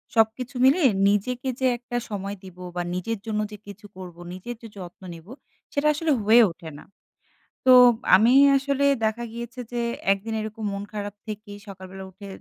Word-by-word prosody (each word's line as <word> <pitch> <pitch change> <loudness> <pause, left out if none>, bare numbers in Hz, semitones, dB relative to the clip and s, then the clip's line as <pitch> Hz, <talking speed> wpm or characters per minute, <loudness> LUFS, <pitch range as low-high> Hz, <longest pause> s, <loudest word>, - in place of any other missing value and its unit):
সবকিছু 230 +4 +1
মিলিয়ে 275 +2 +5 0.2
নিজেকে 250 +6 -1
যে 260 - 0
একটা 245 0 -5
সময় 200 -1 -4
দিব 185 -2 -12 0.2
বা 175 - -1
নিজের 205 +4 -3
জন্য 215 -1 -2
যে 210 - -8
কিছু 205 +1 -11
করবো 180 -2 -10
নিজের 235 +7 -7
যে 230 - -9
যত্ন 180 -1 -10
নেব 165 +1 -13 0.5
সেটা 290 0 +1
আসলে 315 +1 -1
হয়ে 225 +3 +7
ওঠে 165 -1 -10
না। - - -13 0.8
তো 255 - +7 0.4
আমি 225 +6 +5 0.3
আসলে 280 0 -1 0.2
দেখা 220 +2 -1
গিয়েছে 235 +2 -8
যে 240 -1 -2 0.3
একদিন 200 +3 -2
এরকম 220 +1 -7
মন 200 0 -4
খারাপ 205 -1 -5
থেকেই 210 -1 -7
সকালবেলা 190 0 -9
উঠে 200 +2 -12
215 Hz, 170 wpm, -24 LUFS, 195-240 Hz, 0.8 s, হয়ে